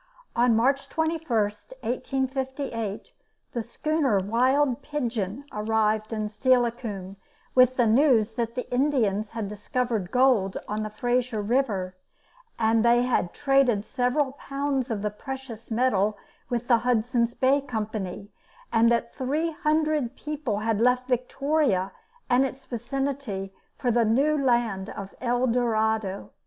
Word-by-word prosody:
On 240 -1 +4
March 270 +5 +2
21, 320 0 -1
1858, 260 - -2 0.4
the 235 - -2
schooner 275 0 0
Wild 250 +7 +2
Pigeon 245 -4 -3
arrived 215 0 0
at 215 -1 -2
Steilacoom 230 -6 0 0.4
with 255 0 +5
the 245 - +3
news 230 -2 +4
that 230 0 -3
the 250 - -3
Indians 235 -7 +1
had 225 -3 -4
discovered 210 -1 -2
gold 245 -7 +3
on 215 +1 -2
Fraser 245 +1 -1
River, 205 -5 0 0.6
that 225 0 +3
they 240 +1 +4
had 240 -8 0
traded 270 -7 +2
several 260 +3 0
pounds 275 -1 -2
of 210 -3 -2
the 210 - 0
precious 250 0 -8
metal 215 -3 +1 0.3
with 240 -1 -2
the 235 -2 +5
Hudson's 235 0 +1
Bay 270 +2 +3
Company, 210 -6 -4 0.4
and 230 +1 +5
that 235 0 0
three 300 +6 -1
hundred 305 -4 0
people 295 -8 -3
had 225 -1 +1
left 250 +1 +3
Victoria 255 -5 +1 0.4
and 250 +2 +4
its 270 0 -4
vicinity 240 -5 -3 0.2
for 245 - 0
the 235 0 +3
new 275 +8 +3
land 235 -8 +1
of 195 -1 -7
El 245 0 +1
Dorado. 220 -4 0
240 Hz, 125 wpm, -26 LUFS, 215-265 Hz, 0.6 s, with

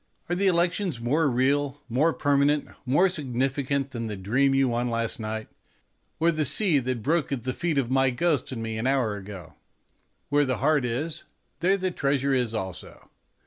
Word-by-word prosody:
Are 175 - +1
the 195 +2 +1
elections 175 - +1
more 145 +6 +1
real, 140 +3 +1
more 135 +7 +2
permanent, 145 0 +2 0.2
more 145 +9 +4
significant 135 -3 -1
than 115 -2 -4
the 105 -2 -5
dream 130 +8 +2
you 135 -1 +3
won 120 0 0
last 115 +1 -2
night, 110 0 -4 0.7
or 165 +2 +4
the 155 -1 0
sea 165 +1 +2
that 125 -3 -3
broke 160 +2 +1
at 130 -5 -2
the 130 0 -2
feet 165 0 -1
of 130 -3 0
my 135 0 +3
ghost 140 +2 0
and 115 -3 -4
me 110 -1 -3
an 120 - -1
hour 130 -6 +1
ago? 95 -5 -9 0.8
Where 145 +1 +3
the 130 -3 -1
heart 145 -1 +2
is, 145 +7 -3 0.4
there 190 +4 +3
the 185 -1 -1
treasure 140 -3 0
is 120 -3 0
also. 95 -4 -7
135 Hz, 185 wpm, -26 LUFS, 120-150 Hz, 0.8 s, more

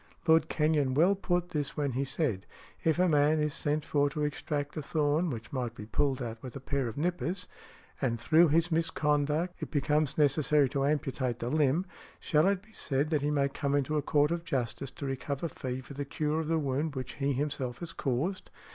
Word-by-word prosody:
Lord 160 0 +5
Kenyon 150 -4 +2
well 175 +7 +5
put 175 -2 -1
this 150 -5 -3
when 145 -2 0
he 130 +3 -1
said: 135 - -1 0.4
"If 160 -1 +2
a 180 +1 +4
man 150 -1 +4
is 150 -1 0
sent 150 -1 -1
for 145 -1 +2
to 150 +2 -3
extract 145 0 -2
a 155 - -2
thorn 150 +3 +1
which 115 -3 -6
might 125 -3 -2
be 105 - -8
pulled 135 +3 0
out 115 -1 -6
with 130 0 -8
a - - -4
pair 135 -1 -1
of 115 - -6
nippers, 180 +3 -1 0.5
and 120 -4 0
through 160 +8 +5
his 165 +3 +2
misconduct 155 +1 0
it - - -4
becomes 150 -1 +1
necessary 145 -1 +3
to 140 0 0
amputate 135 -4 -1
the 120 - -3
limb, 155 +3 +2 0.3
shall 155 +2 +3
it 195 -1 +1
be 220 +1 -21
said, 140 -3 -1
that 150 -3 +2
he 145 - 0
may 140 -2 +2
come 140 0 -1
into 145 +2 0
a 150 - +2
court 150 +1 +2
of 170 0 -1
justice 135 -4 -2
to 140 +2 -7
recover 140 +3 -3
fee 130 -3 -5
for 130 - -11
the 145 +1 -3
cure 150 +2 -1
of 160 - -2
the 165 0 +2
wound 145 +1 -1
which 130 -1 -4
he 140 +1 +2
himself 135 -3 -2
has 170 -1 -7
caused?" 150 +9 -2
145 Hz, 210 wpm, -30 LUFS, 135-160 Hz, 0.5 s, Lord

